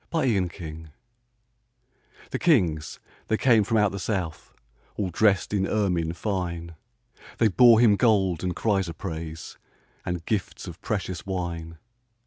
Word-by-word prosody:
Christmas 120 - +1
Carol 80 -3 -8 1.5
The - - -2
kings 90 - +1 0.3
they 110 - +1
came 115 -4 +4
from 115 +2 0
out 105 -2 +3
the 100 - -5
south, 90 -6 -3 0.4
All 95 -3 -2
dressed 100 +2 +2
in 95 -1 +1
ermine 90 -6 0
fine, 85 -3 -3 0.6
They 115 - +4
bore 115 +2 +6
Him 110 -4 +5
gold 95 -7 +2
and 90 -1 -2
chrysoprase, 85 -6 -3 0.4
And 90 -2 -4
gifts 105 -4 -3
of 85 0 -9
precious 95 -4 -4
wine. 85 -3 -4
95 Hz, 125 wpm, -25 LUFS, 85-105 Hz, 1.5 s, bore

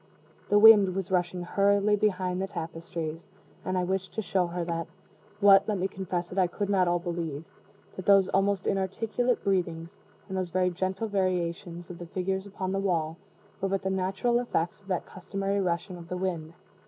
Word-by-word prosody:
The 205 - +5
wind 205 -3 +8
was 195 0 -3
rushing 180 -1 0
hurriedly 200 +3 +3
behind 185 -3 0
the 195 - -1
tapestries, 165 -1 -5 0.4
and 185 0 -1
I 180 - +1
wished 190 +1 -2
to 220 - -2
show 185 -2 +1
her 170 -1 -3 0.5
(what, 200 -1 +7
let 210 - +1
me 185 +1 0
confess 185 -2 -4
it, 190 - -1
I 185 - +4
could 200 +3 -3
not 185 -2 +3
all 175 0 +2
believe) 170 -3 -4 0.5
that 185 - -7
those 195 -2 +6
almost 195 0 +1
inarticulate 225 +6 0
breathings, 175 -1 -1 0.3
and 190 - -5
those 185 -2 -2
very 180 +1 +1
gentle 190 +4 -2
variations 175 -3 -2
of 170 - -10
the 175 - -7
figures 190 +2 -2
upon 190 -1 -4
the 195 - 0
wall, 165 -5 0 0.5
were 195 - 0
but 195 0 -1
the 190 - 0
natural 190 +6 +1
effects 205 -6 -2
of 195 - -23
that 185 -3 -1
customary 195 +2 -3
rushing 180 +1 -2
of 170 -1 -11
the 180 - -3
wind. 170 -3 -3
185 Hz, 185 wpm, -28 LUFS, 175-195 Hz, 0.5 s, wind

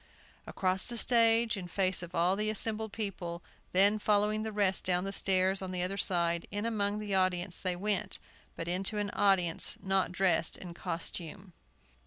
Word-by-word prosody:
Across 185 0 +1
the 240 -1 -4
stage, 230 -1 +4
in 185 -3 -6
face 185 0 0
of 175 0 -8
all 175 +3 +2
the 215 +1 -1
assembled 220 0 0
people, 180 -6 -5 0.3
then 200 +3 +5
following 210 +1 +1
the 220 0 -4
rest 200 -2 +1
down 180 -1 0
the 195 0 -4
stairs 190 0 +1
on 190 - -5
the 180 -1 -2
other 185 +2 -2
side, 170 -3 0
in 205 +2 -3
among 205 -2 -1
the 210 -1 -4
audience, 185 -1 +1
they 185 -2 -1
went; 205 +2 -1 0.4
but 165 - -6
into 190 +4 -1
an 205 0 -2
audience 180 -4 +1
not 190 -1 0
dressed 180 -3 +1
in 175 -2 -8
costume! 175 +2 -6
195 Hz, 175 wpm, -31 LUFS, 180-210 Hz, 0.4 s, then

